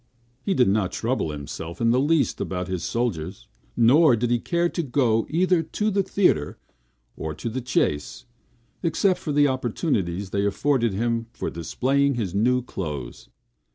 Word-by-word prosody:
He 195 - -1
did 125 - +4
not 100 -2 +1
trouble 120 -7 -1
himself 75 +3 -7
in 115 0 +3
the 125 - +3
least 145 -2 +1
about 90 -1 -3
his 90 -3 -3
soldiers; 95 -7 -3 0.3
nor 130 +4 +6
did 120 +1 -1
he 120 - +2
care 170 +6 0
to 170 - -2
go 120 -6 +1
either 180 +1 +2
to 210 +6 -2
the 200 0 +2
theatre 180 - +1 0.6
or 80 -1 -5
the 115 +9 -4
chase, 75 -11 -1 0.6
except 180 +2 +1
for 155 - -4
the 145 0 +4
opportunities 105 - -1
then 100 0 +1
afforded 120 +1 +1
him 115 +1 -1
for - - -4
displaying 135 - 0
his 105 -7 -3
new 125 +5 +2
clothes. 75 - -6
120 Hz, 155 wpm, -24 LUFS, 95-145 Hz, 0.6 s, nor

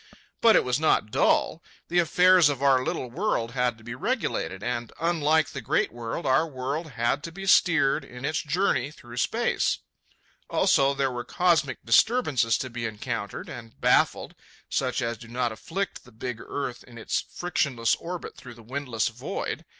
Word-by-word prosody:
But 225 -1 +6
it - - +5
was 125 +2 0
not 155 -8 +2
dull. - - +2 0.3
The 175 - +2
affairs 180 0 +5
of 140 -1 -3
our 135 -2 +4
little 125 -1 -3
world 130 - -1
had 125 -2 0
to 110 - -18
be 120 +1 -6
regulated, 125 - -2
and, 120 -1 -3
unlike 160 -2 +2
the 140 - -6
great 115 - +1
world, 115 -1 -5
our 135 +5 +3
world 145 +3 -4
had 120 +4 0
to 165 - -6
be 195 +3 -8
steered 160 -6 +4
in 125 0 -8
its 155 +2 0
journey 145 -5 0
through 120 -5 -12
space. - - +1 0.7
Also, 140 0 +3
there 135 -1 0
were 120 -1 -4
cosmic 160 -8 +1
disturbances 130 - +3
to 130 - -4
be 115 -1 -3
encountered 110 -1 -5
and 115 -3 -10
baffled, - - +2 0.4
such 130 0 -1
as 115 -1 -3
do 120 - -11
not 120 0 -1
afflict 195 - -4
the 125 - -17
big 115 +1 -6
earth 130 -4 -5
in 120 -2 -14
its 110 - -1
frictionless 140 -9 -1
orbit 175 +1 -6
through 120 -2 -11
the 115 - -15
windless 125 -2 -2
void. - - -5
130 Hz, 175 wpm, -26 LUFS, 120-160 Hz, 0.7 s, But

